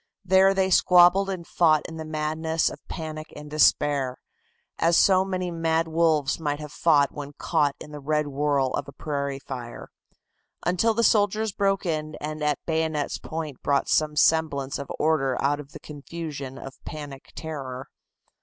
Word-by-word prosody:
There 190 +1 +5
they 190 0 +1
squabbled 180 +2 +5
and 185 -3 -4
fought 155 -4 +3
in 160 - -8
the 160 - -6
madness 155 +1 -1
of - - -10
panic 155 -2 -6
and 150 0 -10
despair, 145 -3 +2 0.6
as 165 0 +4
so 190 -1 +5
many 185 -2 -3
mad 165 0 0
wolves 160 -4 +1
might 145 -2 -2
have 150 -1 -8
fought 145 -4 +3
when 145 -1 -8
caught 145 0 0
in 150 - -10
the 150 - -7
red 150 +2 0
whirl 140 -2 0
of - - -2
a - - -10
prairie 140 -3 -3
fire, 125 -3 -8 0.8
until 200 +6 +2
the 230 - +2
soldiers 215 0 +2
broke 195 0 0
in 155 -2 -2
and 155 +1 -5
at 150 -1 +1
the - - -60
bayonet's 160 -2 -1
point 155 -4 -6
brought 140 -1 +1
some 155 -1 +2
semblance 150 -4 +2
of 140 - -7
order 135 -5 +1
out 145 +1 +1
of 145 -1 -10
the - - -10
confusion 145 -2 -7
of 135 0 -10
panic 145 -4 -8
terror. 135 -5 -6
155 Hz, 170 wpm, -25 LUFS, 145-170 Hz, 0.8 s, There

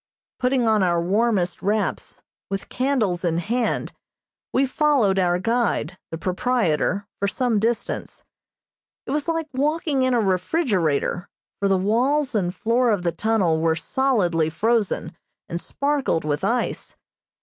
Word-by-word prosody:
Putting 250 -2 +2
on 215 -2 +3
our 175 -2 +2
warmest 195 0 +1
wraps, 210 +1 -2 0.3
with 195 0 -4
candles 245 -10 0
in 170 -2 +1
hand, 230 +7 -1 0.6
we 270 - +3
followed 260 -8 +2
our 175 -1 +2
guide, 205 -5 0
the 165 - -5
proprietor, 190 -1 0
for 200 - +1
some 225 +2 0
distance. 230 +2 -2 0.8
It - - -5
was 295 +2 -1
like 325 -1 -1
walking 295 +1 0
in 255 -1 +2
a - - +3
refrigerator, 185 - 0 0.3
for 200 - +1
the 195 -1 +3
walls 250 +9 +1
and 185 -5 0
floor 235 +6 +1
of 205 -5 +1
the 170 - +1
tunnel 175 -3 +1
were 165 -1 +2
solidly 175 - +1
frozen 205 -2 0 0.3
and 170 +1 -4
sparkled 280 - -1
with 150 +3 -1
ice. 235 +5 -2
210 Hz, 140 wpm, -23 LUFS, 180-250 Hz, 0.8 s, on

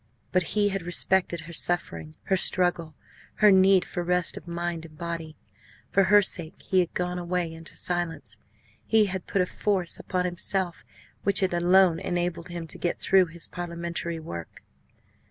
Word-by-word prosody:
But 185 - +3 0.2
he 205 -1 +3
had 195 -1 -2
respected 175 0 +2
her 170 +1 -10
suffering, 85 - -1
her 190 - +1
struggle, 175 -4 0 0.4
her 210 -1 +5
need 190 -1 +5
for 175 - -4
rest 180 0 +1
of - - -10
mind 170 -1 -3
and 155 -2 -13
body. 165 -2 -5 0.6
For 195 0 +4
her 205 +2 +6
sake 170 -4 -1
he 190 - +1
had 175 -2 -1
gone 180 0 -2
away 175 -1 -2
into 165 0 -10
silence; 175 -2 -2 0.5
he 220 -1 +4
had 190 -2 -4
put 195 - +1
a - - -1
force 185 -2 0
upon 180 -1 -2
himself 180 0 0 0.4
which 200 0 +2
had 185 -2 +1
alone 175 0 +4
enabled 175 -1 -3
him 170 -1 -6
to 160 - -7
get 175 - -2
through 190 -2 +4
his 165 +1 -2
parliamentary 170 -1 -4
work. 85 - -9
175 Hz, 170 wpm, -26 LUFS, 170-185 Hz, 0.6 s, her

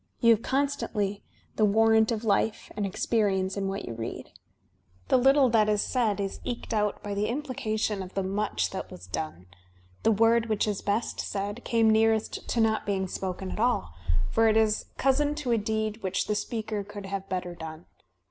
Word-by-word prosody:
You 230 -2 +6
have 220 - -1
constantly 245 -7 -1 0.4
the 215 - +3
warrant 220 +2 +4
of 225 -1 -2
life 215 0 0
and 205 -1 -1
ex 190 - -3
perience 195 -4 +1
in 195 -1 -1
what 195 +1 -3
you 115 - -5
read. 115 0 -6 0.8
The - - +5
little 270 +2 +5
that 215 -2 +3
is 210 -1 +2
said 225 -6 0
is 195 -1 -3
eked 235 -1 -4
out 210 -1 0
by 205 - -3
the 205 +1 0
implication 220 -6 -2
of 185 0 -9
the 195 - 0
much 200 +3 -1
that 190 - -5
was 90 0 -10
done. 80 -3 -3
•. 85 - -20
• - - -18 0.6
The 225 - +3
word 230 +2 +4
which 215 -1 +1
is 205 -2 -1
best 205 +3 -1
said 205 +4 -3
came 230 -1 +2
nearest 220 0 +2
to 235 - 0
not 220 -1 +2
being 190 -2 0
spoken 185 0 -4
at - - -5
all, 230 - +1 0.4
for 225 0 +4
it 220 0 +4
is 220 -1 +2
cousin 290 +2 +2
to 295 -5 -2
a 230 - +3
deed 220 +1 -2
which 190 0 -1
the 210 - 0
speaker 215 0 -3
could 205 0 -9
have 195 0 -5
better 180 -1 -3
done. 160 0 -8
210 Hz, 200 wpm, -28 LUFS, 195-225 Hz, 0.8 s, You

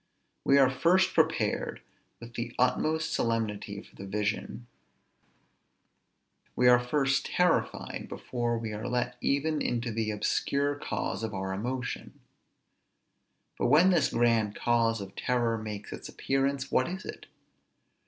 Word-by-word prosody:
_ - - -46 0.4
We 140 - +5
are 135 -2 +5
first 175 +7 +3
prepared - - +1 0.4
with 115 0 -11
the 120 +1 -5
utmost 155 +6 +1
solemnity 105 -3 -1
for - - -20
the 100 - -8
vision; 105 +4 -2 1.9
we 125 - +4
are 125 0 +7
first 135 +2 +1
terrified, 180 -1 0
before 120 -2 -2
we 115 -1 -4
are 110 +4 -4
let 125 0 -1
even 150 +2 +1
into 120 -1 -1
the 110 0 -1
obscure 140 +6 0
cause 130 -8 -3
of 110 -2 -3
our 95 0 -3
emotion: 125 +5 -4 1.4
but - - +2
when 160 +9 +6
this 170 -4 +3
grand 115 -3 +2
cause 115 -2 +1
of 95 -1 -9
terror 120 -2 +1
makes 105 -2 -6
its - - -8
appearance, 135 0 -1
what 130 - +3
is 185 +2 -5
it? - - -8
120 Hz, 135 wpm, -29 LUFS, 110-140 Hz, 1.9 s, are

